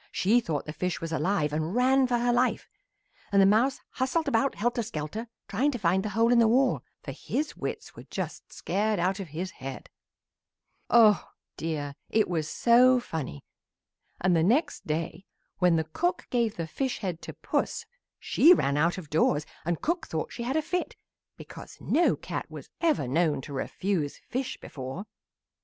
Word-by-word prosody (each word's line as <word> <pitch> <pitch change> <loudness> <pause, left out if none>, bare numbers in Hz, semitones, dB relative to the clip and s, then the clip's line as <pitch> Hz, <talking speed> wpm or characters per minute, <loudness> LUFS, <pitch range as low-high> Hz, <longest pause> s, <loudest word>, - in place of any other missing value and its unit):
She 220 +6 +3
thought 160 -11 -3
the 150 - -6
fish 180 +3 -2
was 165 0 -5
alive 160 -3 0
and 160 +5 -2
ran 260 +1 +4
for 245 -1 +1
her 240 0 +1
life, 250 +1 +1 0.6
and 200 - +4
the 195 - +7
mouse 225 +7 +3
hustled 285 +5 -1
about 275 +1 +1
helter 240 +3 0
skelter 215 +2 -5 0.2
trying 250 +9 +1
to 265 - -2
find 190 -2 +2
the 215 - -3
hole 225 +3 +2
in 245 - +5
the 230 - +5
wall, 250 +3 +2 0.2
for - - -5
his 305 +2 -3
wits - - -5
were - - -11
just - - -5
scared 210 +2 -1
out 185 +3 0
of 195 - -5
his 170 +5 -5
head. 135 -3 -8 1.0
"Oh 220 -3 +5 0.3
dear! 150 -3 -3 0.2
it 220 -1 +2
was 160 -3 -2
so 250 +2 +5
funny, 155 - -6 0.7
and 180 -1 +2
the 165 - +3
next 240 - +1
day 165 +5 -3 0.3
when 180 -2 +4
the 160 - +2
cook 350 - -2
gave 235 -4 +1
the 165 - -3
fish 260 - -2
head 180 -5 -3
to - - -8
Puss 460 - -2 0.3
she 350 +4 +5
ran 140 - 0
out 170 +5 +2
of 180 -5 -7
doors 155 -1 +2 0.2
and 170 -1 -2
cook 340 0 -1
thought 160 - -3
she - - -6
had 255 +5 -1
a 315 - +1
fit 360 +3 -2 0.4
because - - -11
no 340 +3 +2
cat - - -5
was - - -10
ever 310 - +2
known 155 +3 +1
to 140 +2 -9
refuse 155 +2 -2
fish 260 +1 -4
before. 135 +8 -7
200 Hz, 180 wpm, -28 LUFS, 160-245 Hz, 1.0 s, the